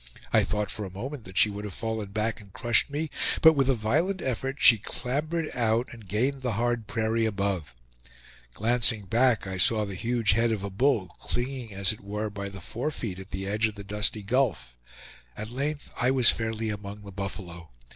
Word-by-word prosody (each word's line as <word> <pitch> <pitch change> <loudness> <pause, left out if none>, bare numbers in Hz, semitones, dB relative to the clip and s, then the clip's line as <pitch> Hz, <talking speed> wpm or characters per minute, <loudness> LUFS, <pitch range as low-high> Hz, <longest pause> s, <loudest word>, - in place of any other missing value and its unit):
I - - +6
thought 105 -2 -1
for 105 - -4
a 95 - -5
moment 120 +7 -6
that 95 +1 -9
she 105 - +5
would 100 +1 -6
have 105 -3 -6
fallen 110 -3 -3
back 110 +2 -1
and 100 -2 -16
crushed 120 +5 +2
me, 150 +2 -3 0.3
but 160 0 +10
with 135 -3 +2
a 135 - +4
violent 155 - +1
effort 135 0 -1
she 115 -4 +7
clambered 150 +9 -2
out 115 0 +1
and 115 -4 -12
gained 130 +8 0
the 125 -3 -1
hard 120 0 0
prairie 110 -1 +1
above. 100 - -2 0.8
Glancing 115 -1 +3
back 115 +2 +3
I 95 -1 -4
saw 110 +3 +4
the 100 - -6
huge 115 +3 +1
head 115 +3 +3
of 105 -3 -2
a 100 - -4
bull 110 -2 +2
clinging 120 -4 -3
as 100 +1 +2
it 110 - -8
were 105 +2 -3
by 100 -1 -5
the 95 0 -9
forefeet 115 - -4
at 95 +1 -10
the 95 0 -4
edge 105 +3 +1
of 110 - -7
the 100 - -8
dusty 105 +1 -1
gulf. 105 - 0 0.6
At 110 +1 -5
length 145 +4 -3
I 125 - +2
was 130 -3 +5
fairly 110 0 -2
among 105 0 -6
the 100 - -9
buffalo. 95 -4 -6
110 Hz, 200 wpm, -27 LUFS, 100-125 Hz, 0.8 s, but